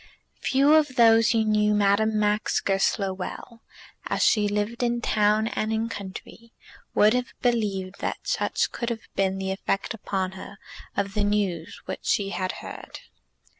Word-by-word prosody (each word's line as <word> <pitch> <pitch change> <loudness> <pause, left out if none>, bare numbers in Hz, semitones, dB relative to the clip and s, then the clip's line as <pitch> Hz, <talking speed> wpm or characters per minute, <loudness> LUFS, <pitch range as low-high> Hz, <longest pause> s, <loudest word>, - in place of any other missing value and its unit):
Few 275 +3 +3
of 300 -4 +3
those 225 -1 +6
who 225 -2 +2
knew 210 0 +2
Madame 210 +2 +2
Max 210 0 +1
Goesler 195 0 0
well, 210 +5 -8 0.5
as - - 0
she 210 -2 +4
lived 210 +4 -2
in 240 -1 +1
town 215 -1 +2
and 215 +1 -2
in 225 +1 -1
country, 215 +3 -9 0.4
would 210 +2 +5
have 250 0 -2
believed 200 -6 -1
that - - -2
such - - 0
could 235 - -3
have 230 -2 -5
been 190 0 +1
the 190 0 -3
effect 195 +1 -2
upon 190 -3 -3
her 190 +1 -10 0.4
of 200 0 -1
the 210 -1 0
news 200 -5 -1
which 190 - -6
she 200 -1 +1
had 185 -2 -2
heard. - - -9
210 Hz, 160 wpm, -25 LUFS, 195-230 Hz, 0.5 s, those